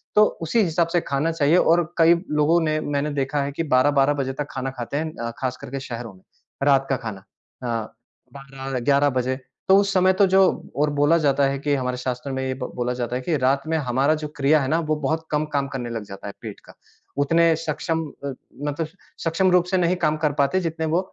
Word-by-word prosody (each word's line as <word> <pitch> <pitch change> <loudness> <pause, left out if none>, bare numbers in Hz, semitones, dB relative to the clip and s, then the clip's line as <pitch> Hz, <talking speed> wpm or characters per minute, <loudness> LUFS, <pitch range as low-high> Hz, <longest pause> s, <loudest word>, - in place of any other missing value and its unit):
तो 210 - +7 0.2
उसी 165 +8 +1
हिसाब 170 -2 +1
से 175 - +4
खाना 145 +3 -1
चाहिए 160 +1 +3
और 175 0 +4
कई 165 0 +6 0.2
लोगों 160 +3 +4
ने 155 -1 0
मैंने 145 0 -1
देखा 140 +1 -1
है 140 - -3
कि 155 +4 -3
12-12 140 +2 +4
बजे 135 -2 -2
तक 145 +2 -4
खाना 130 0 -3
खाते 120 +4 -3
हैं 155 +1 -3
अ, 115 0 -3
खास 130 -1 -2
कर - - -8
के 135 - -3
शहरों 120 -4 -7
में, 95 - -20 0.4
रात 135 -1 +3
का 135 - +2
खाना 105 -5 -7 0.4
अ, 115 -3 -3 0.4
12-11 135 +1 0
बजे। 130 +1 -1 0.3
तो 190 - +8
उस 200 0 +2
समय 185 0 +4
तो - - +8
जो 190 +1 +4 0.4
और 150 +1 +2
बोला 150 +3 +5
जाता 140 0 +3
है 135 0 -1
कि 145 +1 0
हमारे 125 -2 -2
शास्त्र 125 +2 -4
में 130 0 -2
ये 130 - -1
ब - - -4
बोला 125 0 -1
जाता 125 0 -3
है 125 - -2
कि 155 +5 -1
रात 135 +1 +1
में 160 0 +1
हमारा 135 +1 +1
जो - - -2
क्रिया 145 +1 +3
है 130 - -1
ना 160 +4 +2
वो 155 - +3
बहुत 160 +3 -1
कम 150 0 +1
काम 140 -1 +1
करने 130 -3 -5
लग 115 -2 -4
जाता 100 0 -9
है 100 - -6
पेट - - -8
का। - - -15 0.4
उतने 165 +3 +3
सक्षम 165 +1 -2 0.2
अ, 140 - -2 0.4
मतलब 150 +2 -2 0.4
सक्षम 180 +3 +2
रूप 180 -1 +4
से 190 - +3
नहीं 180 0 +2
काम 155 0 +1
कर 150 -1 +1
पाते 140 +6 +3
जितने 165 -1 -2
वो 175 - +4
145 Hz, 230 wpm, -23 LUFS, 130-160 Hz, 0.4 s, तो